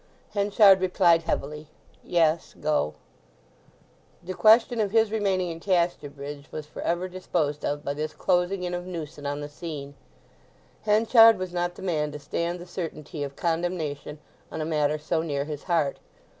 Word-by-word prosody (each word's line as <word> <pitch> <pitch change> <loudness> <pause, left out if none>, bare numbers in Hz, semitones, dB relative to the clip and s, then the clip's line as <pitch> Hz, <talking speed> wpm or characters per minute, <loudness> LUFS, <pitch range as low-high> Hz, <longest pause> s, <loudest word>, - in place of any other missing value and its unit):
Henchard 200 -1 +5
replied 180 -2 +4
heavily, 150 -1 -3 0.4
"Yes; 165 -2 +1
go." 150 - 0 1.3
The 185 +2 -5
question 225 +4 +5
of 205 - 0
his 220 0 +3
remaining 190 -5 0
in 165 - -7
Casterbridge 145 -6 -2
was 155 - -6
for 150 - -9
ever 175 +2 -1
disposed 170 -5 -2
of 145 0 -2
by 140 - -1
this 155 +1 -4
closing 180 +1 +1
in 180 0 -3
of 175 0 -4
Newson 155 -5 -6
on 145 +1 -3
the 145 - -5
scene. 145 -2 -7 0.9
Henchard 225 +1 +6
was 185 -1 -5
not 175 0 -1
the - - -10
man 155 -5 -1
to - - -5
stand 170 +4 -3
the 175 - -10
certainty 160 -4 -6
of 140 -1 -4
condemnation 165 -4 -2 0.3
on - - -5
a 155 - -2
matter 150 -1 +1
so 160 +2 -1
near 145 -4 -2
his 150 -1 -7
heart. 165 -6 0
170 Hz, 160 wpm, -26 LUFS, 150-185 Hz, 1.3 s, Henchard